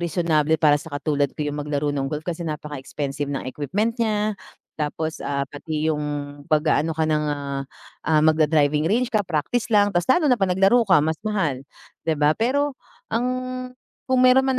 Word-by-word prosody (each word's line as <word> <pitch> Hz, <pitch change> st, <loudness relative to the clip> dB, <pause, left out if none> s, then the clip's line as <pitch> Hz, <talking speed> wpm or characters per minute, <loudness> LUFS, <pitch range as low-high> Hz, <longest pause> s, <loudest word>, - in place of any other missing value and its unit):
reasonable 160 Hz, -2 st, +1 dB
para 150 Hz, -2 st, +5 dB
sa 160 Hz, -, -11 dB
katulad 145 Hz, -1 st, 0 dB
ko 150 Hz, -1 st, -3 dB
yung 145 Hz, 0 st, -4 dB
maglaro 145 Hz, 0 st, -1 dB
ng 135 Hz, -1 st, -2 dB
golf 150 Hz, +1 st, -4 dB
kasi 170 Hz, 0 st, -3 dB
napaka-expensive 145 Hz, -2 st, -4 dB
ng 135 Hz, -, -3 dB
equipment 205 Hz, -, -2 dB
niya, 215 Hz, -2 st, 0 dB, 0.4 s
tapos, 155 Hz, +1 st, -3 dB
ah, 140 Hz, 0 st, -2 dB
pati 155 Hz, +2 st, -4 dB
yung 150 Hz, -1 st, -3 dB, 0.5 s
'pag-aano 155 Hz, 0 st, +2 dB
ka 160 Hz, -, +3 dB
ng 150 Hz, -1 st, +1 dB, 1.0 s
magda-driving 155 Hz, -1 st, +3 dB
range 245 Hz, +4 st, +2 dB
ka 215 Hz, -, +3 dB
practice 195 Hz, +7 st, -2 dB
lang 205 Hz, -2 st, +4 dB
ta's 175 Hz, -, +3 dB
lalo 310 Hz, +3 st, +4 dB
na 260 Hz, -, +5 dB
pa -, -, +4 dB
naglaro 195 Hz, +6 st, +4 dB
ka 185 Hz, -, +7 dB
mas 160 Hz, +1 st, 0 dB
mahal, 180 Hz, -, -1 dB, 0.4 s
'di 160 Hz, -, 0 dB
ba? 150 Hz, +1 st, +4 dB
Pero, 275 Hz, -, 0 dB, 0.4 s
ang 235 Hz, +2 st, +1 dB, 0.8 s
kung 260 Hz, -, +4 dB
meron 255 Hz, +1 st, +6 dB
man 265 Hz, -1 st, +1 dB
160 Hz, 170 wpm, -23 LUFS, 150-210 Hz, 1.0 s, ka